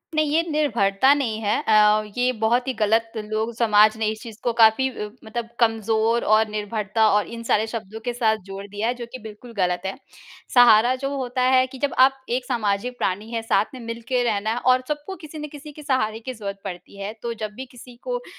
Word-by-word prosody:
नहीं, 305 -1 +1
ये 325 +2 +3
निर्भरता 250 -4 +3
नहीं 235 -7 -1
है 210 0 +1
अ, 215 0 +4
ये 250 +1 +2
बहुत 240 +4 +2
ही 260 - 0
ग़लत 225 +1 +1
लोग 215 +2 -3
समाज 215 -1 +4
ने 220 - -1
इस 220 - -8
चीज़ 225 -2 -10
को 240 - 0
काफ़ी 225 +4 +5 0.3
मतलब 230 +1 -5
कमज़ोर 225 0 +2
और 220 0 +3
निर्भरता 215 +1 0
और 205 0 +2
इन 230 0 -8
सारे 220 +1 +2
शब्दों 220 -1 -6
के 245 - -1
साथ 220 -3 +1
जोड़ 195 0 -7
दिया 205 +3 -3
है, 245 - +1
जो 240 -1 -7
कि 255 - -7
बिल्कुल 220 +2 -11
ग़लत 180 -1 +1
है। 190 - -2 0.6
सहारा 240 0 +6
जो 275 - 0
होता 255 -1 -2
है 255 0 +4
कि 265 - -11
जब 285 - -1
आप 270 +1 +5
एक 250 +1 -1
सामाजिक 235 0 -1
प्राणी 205 +4 -2
हैं, 230 -1 -2
साथ 225 -1 +2
में 255 - -8
मिलके 235 +2 -2
रहना 215 -1 0
है - - -4
और 255 +1 +3
सबको 300 +6 -4
किसी 310 -2 -11
न 300 - -5
किसी 295 0 -10
के 300 +1 -12
सहारे 225 -6 0
की 255 +3 -6
ज़रूरत 200 -3 -6
पड़ती 180 0 -8
है। 205 +2 -4
तो 235 -1 -2
जब 215 -1 -5
भी 265 - -7
किसी 245 0 -14
को - - 0
अ, - - -11
230 Hz, 220 wpm, -23 LUFS, 215-255 Hz, 0.6 s, सहारा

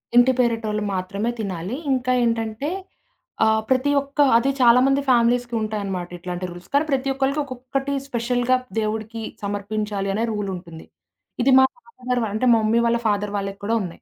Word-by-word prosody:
ఇంటి 245 +2 +7
పేరటోళ్లు 225 -3 0
మాత్రమే 195 +5 -2
తినాలి. 190 +1 -3 0.2
ఇంకా 255 0 0
ఏంటంటే 230 +3 -1 0.8
ఆహ్, 220 0 +3
ప్రతి 260 +2 +2
ఒక్క 280 +1 -10 0.2
అది 265 +4 +1
చాలామంది 255 +3 +5
ఫ్యామిలీస్‌కి 240 0 +3
ఉంటాయన్నమాట 200 -4 -3
ఇట్లాంటి 180 +1 -5
రూల్స్ 175 +1 -12
కానీ 290 +2 +3
ప్రతి 270 0 0
ఒక్కళ్లకి 270 +2 0
ఒక్కొక్కటి 270 +1 -4
స్పెషల్‌గా 245 0 +1 0.2
దేవుడికి 220 +1 -3 0.2
సమర్పించాలి 205 0 -3
అనే 220 +3 0
రూల్ 205 -2 -3
ఉంటుంది. 170 -2 -10 0.6
ఇది 270 - +4
మా 265 - +7 0.2
ఫాదర్ 250 - -3
వాళ్లు 220 - -1
అంటే, 235 - 0
మమ్మీ 225 +1 +2
వాళ్ల 235 0 +2
ఫాదర్ 205 -1 0
వాళ్లకి 195 0 -4
కూడా 225 +3 +1
ఉన్నాయి. 180 -3 -7
230 Hz, 155 wpm, -22 LUFS, 205-255 Hz, 0.8 s, ఇంటి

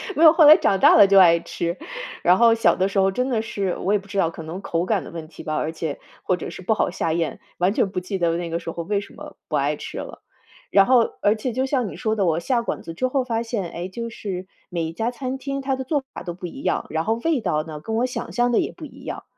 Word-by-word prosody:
没 325 - +2
有， 315 - +10
后 320 -4 +6
来 305 +1 +11
长 195 - +2
大 - - +7
了 200 - +8
就 195 0 +6
爱 170 -2 +7
吃。 170 +1 -4 0.5
然 180 +2 +5
后 235 -1 +6
小 225 - +3
的 190 +1 +1
时 195 0 0
候 195 0 +3
真 250 +6 -1
的 225 -3 +1
是 195 -4 -2
我 200 - 0
也 205 - +3
不 200 - -16
知 200 0 -6
道 165 -4 +3
可 165 - -9
能 170 +5 -6
口 170 -1 -1
感 205 0 0
的 - - -10
问 165 -2 -7
题 165 - -12
吧 155 - -3
而 155 - -1
且 160 -2 -4 0.2
或 185 - +1
者 - - -6
是 - - -9
不 220 +5 +1
好 - - +1
下 165 -2 -1
咽， 165 -1 -2 0.2
完 185 +3 +2
全 200 - +1
不 185 -1 -3
记 190 +2 -4
得 170 -2 +1
那 170 -1 -4
个 165 +1 -2
时 165 - -6
候 170 - -5
为 200 +2 -1
什 - - -13
么 - - -11
不 - - -2
爱 - - +1
吃 - - -8
了。 - - -7 0.5
然 195 -1 +6
后 250 -2 +5 0.2
而 205 +2 +3
且 230 +2 -3
就 260 +2 0
像 260 -5 0
你 - - -7
说 220 -2 -1
的， 200 - +1
我 165 -1 +1
下 235 +7 0
馆 - - -4
子 165 - -8
之 255 +10 0
后 260 0 0
发 230 -2 -2
现， 215 -7 -3
哎， 175 +2 -5
就 230 +5 -6
是 190 -5 -6 0.2
每 170 -2 -2
一 160 +1 -4
家 225 +5 -1
餐 260 +1 -4
厅 275 0 -4
它 270 0 -1
的 265 - -4
做 285 0 0
法 - - -7
都 175 -1 -5
不 180 +1 -9
一 270 +10 -10
样， - - 0
然 160 +1 -2
后 225 - +2
味 325 -4 +2
道 155 -8 -1
呢， 155 -2 -8
跟 220 +8 -4
我 240 +2 +2
想 245 -1 -5
象 245 0 +2
的 - - +3
也 - - -2
不 - - -9
一 - - -13
样。 - - -5
195 Hz, 320 characters per minute, -23 LUFS, 170-240 Hz, 0.5 s, 来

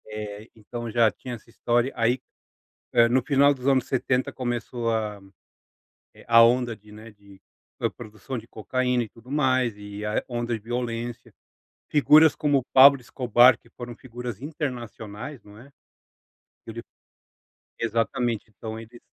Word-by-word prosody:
É, 105 0 -7
então 115 +2 -7
já 115 -1 +4
tinha 125 +3 -8
essa 115 - -16
história 120 +2 0
aí, 120 +3 +1 0.7
eh, 115 0 +5
no 125 +2 +2
final 140 +1 +4
dos 130 -1 -8
anos 135 -2 +3
70 130 0 0
começou 120 -2 -3
a 105 -2 -2 1.1
a 115 0 +7
onda 120 0 +2
de, 105 0 -19
né, 110 +2 -12
de 100 -2 -19 0.6
produção 110 +2 -8
de 115 0 -9
cocaína 125 +3 -1
e 110 - -9
tudo 115 +3 -18
mais 130 -6 +1
e 105 0 -8
a 105 0 -1
onda 120 -1 -3
de - - -6
violência. 120 +1 -5 0.6
Figuras 155 +1 +6
como 145 -2 +2
o 130 - -4
Pablo 135 +1 +8
Escobar 125 0 +4
que - - -25
foram 120 -1 -9
figuras 120 -3 -8
internacionais 125 -4 -6
não 105 0 -15
é. 130 +5 -15 1.0
Ele, 115 +1 -7 1.0
exatamente 115 0 -1
então 110 +1 -8
eles. 115 +1 -13
120 Hz, 145 wpm, -25 LUFS, 110-130 Hz, 1.1 s, Pablo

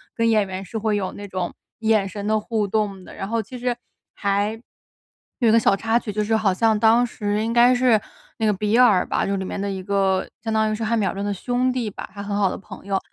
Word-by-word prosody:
跟 230 0 +2
演 215 -3 +3
员 190 0 -5
是 220 +4 -6
会 215 -1 0
有 190 -2 -2
那 205 0 -8
种 185 -2 -3 0.3
眼 220 -3 +2
神 200 +1 -6
的 215 +1 +2
互 215 -1 -1
动 200 -2 -1
的。 - - -12
然 195 - -5
后 230 +1 0
其 235 +4 -9
实 250 - -1 1.7
还 235 - +3
有 - - +6
个 230 - +6
小 205 - +4
插 225 +3 +1
曲， 215 -3 -6
就 210 - 0
是 220 +1 +2
好 215 -4 +2
像 220 +2 +2
当 230 +2 +4
时 210 -1 -2
应 225 - -1
该 240 +1 +6
是 245 -3 +4 0.4
那 225 - -1
个 210 - +4
比 210 +3 0
尔 215 -8 +5
吧， - - 0
就 200 0 0
里 190 - -3
面 - - -4
的 200 0 -2
一 190 -1 -4
个 195 -1 +1 0.2
相 225 - -1
当 220 0 +2
于 215 - 0
是 225 +1 -3
汉 230 +1 +1
密 205 - +1
尔 - - -1
顿 200 +1 -4
的 205 - -1
兄 250 +5 0
弟 240 -4 -2
吧， - - -8
他 200 - -6
很 200 0 -3
好 200 -2 +2
的 - - -5
朋 195 - -12
友。 195 -1 +1
215 Hz, 285 characters per minute, -22 LUFS, 195-225 Hz, 1.7 s, 有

